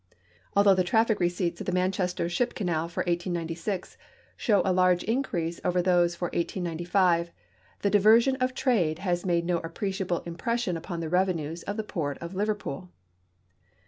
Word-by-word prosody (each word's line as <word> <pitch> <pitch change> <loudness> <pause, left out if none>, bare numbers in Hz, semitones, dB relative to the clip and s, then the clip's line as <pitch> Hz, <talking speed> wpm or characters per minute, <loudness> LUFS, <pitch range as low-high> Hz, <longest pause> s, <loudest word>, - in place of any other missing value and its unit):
Although 200 0 +6
the 185 -1 +2
traffic 220 +4 +2
receipts 175 -1 -1
of - - -6
the - - +1
Manchester 180 -1 0
ship 235 +8 -1
canal 170 -4 -1
for 170 - -2
189(5 175 +1 -3 0.4
show 205 -6 +2
a 190 - +2
large 180 -1 +3
increase 180 -9 -2
over 180 0 +1
those 175 -1 +3
for 175 -1 -3
1895, 170 0 0 0.5
the 200 - +3
diversion 225 +6 +5
of 255 -1 -1
trade 195 - +1
has 180 0 -2
made 170 -1 +1
no 175 -1 +1
appreciable 185 +2 -3
impression 180 +4 -2
upon 170 +1 -5
the 160 - -3
revenues 170 -3 0
of 205 - -5
the 220 - -1
port 150 -8 -3
of 170 +2 -7
Liverpool. 200 - -3
180 Hz, 155 wpm, -27 LUFS, 170-200 Hz, 0.5 s, Although